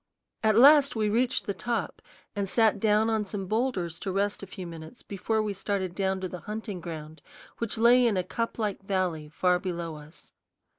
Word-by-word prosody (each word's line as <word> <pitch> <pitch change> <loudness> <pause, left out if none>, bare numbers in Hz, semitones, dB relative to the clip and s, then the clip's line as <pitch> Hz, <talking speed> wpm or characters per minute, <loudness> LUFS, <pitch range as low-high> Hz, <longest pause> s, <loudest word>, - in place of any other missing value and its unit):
At 220 -1 +3
last 280 +2 +7
we 215 -1 +1
reached 240 +4 +1
the 200 - -2
top 235 +5 -3 0.3
and 200 -2 -2
sat 220 -2 +3
down 215 +1 +3
on 220 -1 +1
some 195 -1 -5
boulders 195 -6 -1
to 195 - -3
rest 200 +2 -1
a 200 - -8
few 185 0 -8
minutes 165 +5 -10
before 215 +3 -1
we 210 -1 -2
started 195 -2 -2
down 190 0 -1
to 185 - -2
the 180 0 -7
hunting 210 -3 -6
ground, 160 -1 -8 0.4
which 230 0 -2
lay 240 +2 +6
in 210 -4 +1
a 185 - +1
cuplike 215 0 -3
valley 185 -6 -2
far 180 +3 +2
below 170 -3 -4
us. 150 +2 -15
200 Hz, 190 wpm, -28 LUFS, 180-220 Hz, 0.4 s, last